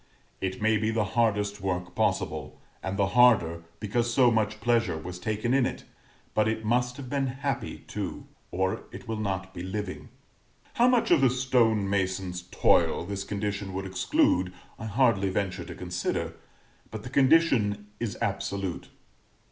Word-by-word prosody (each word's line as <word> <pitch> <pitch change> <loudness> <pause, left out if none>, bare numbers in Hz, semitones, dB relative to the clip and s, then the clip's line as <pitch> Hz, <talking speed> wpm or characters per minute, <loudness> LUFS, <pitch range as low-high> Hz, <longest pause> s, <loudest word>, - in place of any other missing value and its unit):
It 95 0 -2
may 110 0 +4
be 110 +1 0
the 110 -1 +1
hardest 105 -3 +1
work 90 -1 -2
possible, - - -1 0.2
and 95 +1 -3
the 100 -2 +2
harder 95 -10 +5 0.2
because 115 +3 0
so 125 0 +5
much 110 -1 0
pleasure 115 -6 +1
was 90 +3 -7
taken 110 +5 -1
in 135 -1 +4
it; - - -6 0.5
but 110 0 +2
it 110 0 -2
must 125 +2 +1
have 140 -2 -7
been 135 +1 0
happy 135 +2 -3
too, - - -5 0.2
or 95 +1 -1
it 125 - -10
will 110 -1 -3
not 95 -2 -3
be 85 - -6
living. 95 +1 -5 0.6
How 240 - +4
much 250 -6 +3
of 165 -5 +6
the 135 - +6
stone 120 -5 +2
mason's 95 -2 -1
toil - - +3
this 100 +1 -4
condition 100 -1 -3
would 95 0 -3
exclude 90 -1 +2 0.3
I 110 - -6
hardly 110 -3 +2
venture 95 -2 -2
to - - -8
consider, 90 -1 -2 0.6
but 110 -1 -7
the 125 - -7
condition 130 -8 +3
is 115 -4 -3
absolute. 95 -3 -3
105 Hz, 160 wpm, -28 LUFS, 95-120 Hz, 0.6 s, of